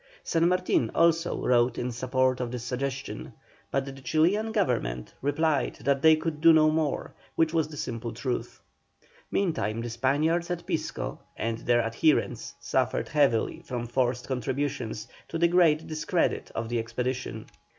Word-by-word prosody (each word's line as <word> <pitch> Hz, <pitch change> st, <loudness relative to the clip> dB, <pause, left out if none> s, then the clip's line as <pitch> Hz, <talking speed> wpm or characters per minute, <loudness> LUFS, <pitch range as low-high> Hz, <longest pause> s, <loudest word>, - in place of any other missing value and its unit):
San 165 Hz, 0 st, +2 dB
Martin 180 Hz, -10 st, +2 dB
also 165 Hz, 0 st, +3 dB
wrote 120 Hz, -1 st, +3 dB
in 125 Hz, +1 st, -2 dB
support 130 Hz, +1 st, +1 dB
of 125 Hz, -1 st, -2 dB
this 120 Hz, -1 st, -5 dB
suggestion, 135 Hz, +1 st, -4 dB, 0.4 s
but 135 Hz, 0 st, 0 dB
the 135 Hz, -, -6 dB
Chilian 165 Hz, +11 st, +1 dB
Government 120 Hz, -, -1 dB
replied 145 Hz, 0 st, +1 dB
that 140 Hz, 0 st, +1 dB
they 160 Hz, +1 st, +7 dB
could 155 Hz, -1 st, -4 dB
do 165 Hz, 0 st, +8 dB
no 155 Hz, -1 st, +5 dB
more, 155 Hz, -2 st, -1 dB, 0.2 s
which 160 Hz, 0 st, +2 dB
was 160 Hz, -2 st, +2 dB
the 150 Hz, -1 st, -10 dB
simple 115 Hz, -3 st, -4 dB
truth. 125 Hz, -3 st, -4 dB, 0.7 s
Meantime 160 Hz, -, 0 dB
the 120 Hz, 0 st, -4 dB
Spaniards 150 Hz, +8 st, +1 dB
at 175 Hz, -1 st, -3 dB
Pisco -, -, -3 dB, 0.2 s
and 115 Hz, 0 st, -2 dB
their 120 Hz, 0 st, +2 dB
adherents 115 Hz, +7 st, +1 dB
suffered -, -, 0 dB
heavily 145 Hz, 0 st, +2 dB
from 125 Hz, -7 st, -4 dB
forced 125 Hz, 0 st, 0 dB
contributions, 130 Hz, -3 st, -2 dB, 0.2 s
to 165 Hz, -, -4 dB
the 170 Hz, +1 st, +4 dB
great 165 Hz, -3 st, +4 dB
discredit 155 Hz, +3 st, -1 dB
of 115 Hz, -, -2 dB
the 120 Hz, -1 st, 0 dB
expedition. 115 Hz, 0 st, -3 dB
135 Hz, 150 wpm, -27 LUFS, 120-160 Hz, 0.7 s, do